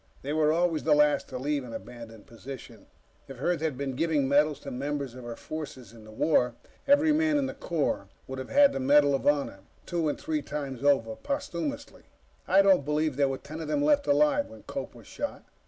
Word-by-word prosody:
They 145 +2 -3
were 155 -1 +3
always 165 -1 +1
the 150 -1 +4
last 150 0 +3
to 130 - -5
leave 140 +2 -1
an 120 -2 -9
abandoned 115 -3 -10
position. 125 +3 -11 0.4
If 135 -3 -10
Earth 175 +3 0
had 155 -5 -1
been 135 -1 -3
giving 150 -2 +1
medals 145 +1 +3
to 140 - -7
members 140 0 -3
of 130 0 -10
her 120 -1 -6
forces 135 -8 -8
in 110 -2 -14
the 110 - -12
war, 125 0 +2 0.3
every 290 +2 +5
man 310 -1 +2
in 280 - +1
the - - -4
Corps 165 -4 -2 0.2
would 130 0 -6
have 130 - -7
had 285 0 +5
the - - -2
Medal 145 +2 +4
of 135 - -1
Honor 145 -9 +1 0.3
two 170 -3 -1
and - - -3
three 310 0 -2
times 140 - -5
over. 135 -6 +2
Posthumously. 280 - -4 0.5
I 195 +1 +5
don't 190 -6 +5
believe 150 0 0
there 140 0 +2
were 135 - -2
ten 155 +4 -9
of 160 - -5
them 290 -1 0
left 290 -1 +3
alive 285 0 +3
when - - -13
Cope - - -6
was - - -14
shot. 290 - -5
150 Hz, 215 wpm, -28 LUFS, 135-175 Hz, 0.5 s, every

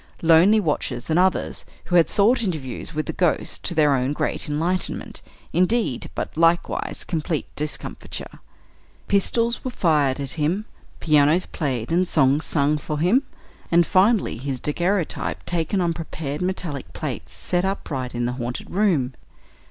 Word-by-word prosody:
"lonely 170 +7 +6
watchers," 145 - -2
and 160 - +3
others, 185 0 +1 0.2
who 175 - -1
had 170 -2 +5
sought 225 +5 +3
interviews 155 - -4
with 155 -1 -2
the - - -4
"ghost," 175 -3 0
to 175 - -2
their 150 -2 +4
own 130 +1 +1
great 150 - -2
enlightenment, 170 +5 -2 0.3
indeed, 185 - +1
but, - - -4
likewise, 165 +1 +1
complete 160 -2 -2
discomfiture. 150 0 -5 0.7
Pistols 230 +4 +1
were 255 - -2
fired 150 - +2
at 135 -2 -4
him, 180 +8 0 0.3
pianos 155 +3 +4
played 130 -7 -3
and 180 +2 +2
songs 140 -1 +3
sung 150 0 +2
for 150 +1 -4
him, 185 - +3 0.5
and, 170 0 +4
finally, 195 - +3
his 130 +1 -4
daguerreotype 175 +5 -1
taken 175 +3 0
on 170 -2 +1
prepared 155 -2 -5
metallic 180 -6 -3
plates 75 +2 -5
set 175 0 -1
upright 140 -10 -3
in 120 0 -1
the 120 - 0
haunted 120 +1 -5
room. 175 -11 +1
160 Hz, 145 wpm, -23 LUFS, 145-185 Hz, 0.7 s, lonely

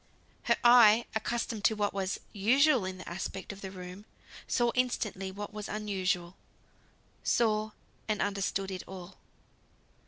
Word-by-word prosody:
Her - - +3
eye, 235 -2 +7
accustomed 220 -1 -2
to 220 - +4
what 205 -1 0
was 195 -1 -2
usual 250 +3 +4
in 185 0 -4
the 185 - -10
aspect 190 +3 -5
of 200 - -13
the 190 - -5
room, 185 +2 -9 0.4
saw 240 -1 +2
instantly 215 -6 -1
what 205 +2 -7
was 210 -1 -6
unusual, 190 -4 -1 0.9
saw, 215 -2 +2 0.4
and 215 -2 0
understood 195 -1 -1
it 185 -1 -4
all. 185 -1 -10
205 Hz, 135 wpm, -30 LUFS, 190-220 Hz, 0.9 s, eye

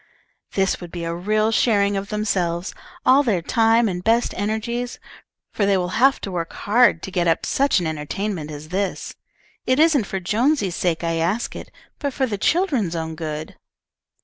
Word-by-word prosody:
"This 195 -1 0
would 175 - -8
be 170 -1 -5
a 165 0 -2
real 215 +5 +1
sharing 205 -3 +2
of 195 +1 -3
themselves, 190 -5 -1 0.3
all 265 +2 +6
their 210 -11 0
time 225 +2 +3
and 180 -2 -3
best 230 +3 +2
energies, 225 +4 -2 0.6
for 210 - 0
they 200 -1 +3
will 180 +2 -2
have 270 +1 +5
to 195 - -5
work 170 -2 -4
hard 210 -5 +3
to 190 - -6
get 175 -2 0
up 165 0 +1
such 275 -6 +2
an 175 - -3
entertainment 160 +2 -3
as 150 0 -8
this. 190 +1 -2 0.5
It 255 +2 +2
isn't 305 -8 +4
for 195 - -3
Jonesy's 215 - +1
sake 170 -2 -1
I 165 0 0
ask 180 +8 -1
it, - - -8 0.3
but 285 -3 -2
for 265 - +1
the 210 -5 -4
children's 265 - +1
own 160 -1 -3
good." 155 -1 -6
200 Hz, 180 wpm, -22 LUFS, 170-230 Hz, 0.6 s, all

